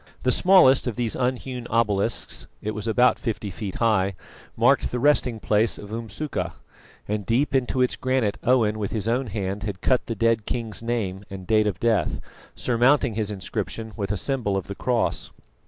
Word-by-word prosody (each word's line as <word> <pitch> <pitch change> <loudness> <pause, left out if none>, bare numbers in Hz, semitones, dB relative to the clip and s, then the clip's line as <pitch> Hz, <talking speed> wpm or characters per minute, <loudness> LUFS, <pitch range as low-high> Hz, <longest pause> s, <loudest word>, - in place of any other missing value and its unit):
The 125 - +3
smallest 160 -7 +5
of 120 - -2
these 120 -3 -1
unhewn 125 -1 -2
obelisks 110 -1 0
it 105 - -3
was 105 +1 -5
about 125 +3 +3
fifty 110 -4 -3
feet 95 +1 -6
high 100 -5 +1 0.4
marked - - +3
the 125 - -3
resting 125 -3 +2
place 110 +2 +1
of 105 0 -10
Umsuka; 110 - -4 0.5
and 105 0 -2
deep 125 +9 +1
into 130 -1 +2
its 125 - 0
granite 130 -5 0
Owen 115 -4 +2
with 100 - -3
his 110 -1 -1
own 125 +3 0
hand 100 -1 -3
had 100 -2 -5
cut 130 -2 +2
the 115 - -3
dead 115 0 +1
king's 115 -3 -3
name 110 -5 -2
and 95 -1 -8
date 110 +1 +3
of 95 -5 -2
death, 115 -2 +1 0.4
surmounting 125 +1 +2
his 110 -1 -2
inscription 105 +3 -4
with 100 -2 -3
a 105 - -1
symbol 115 -4 -1
of 95 - -3
the 100 - -6
cross. 120 +3 -1
115 Hz, 180 wpm, -24 LUFS, 105-125 Hz, 0.5 s, smallest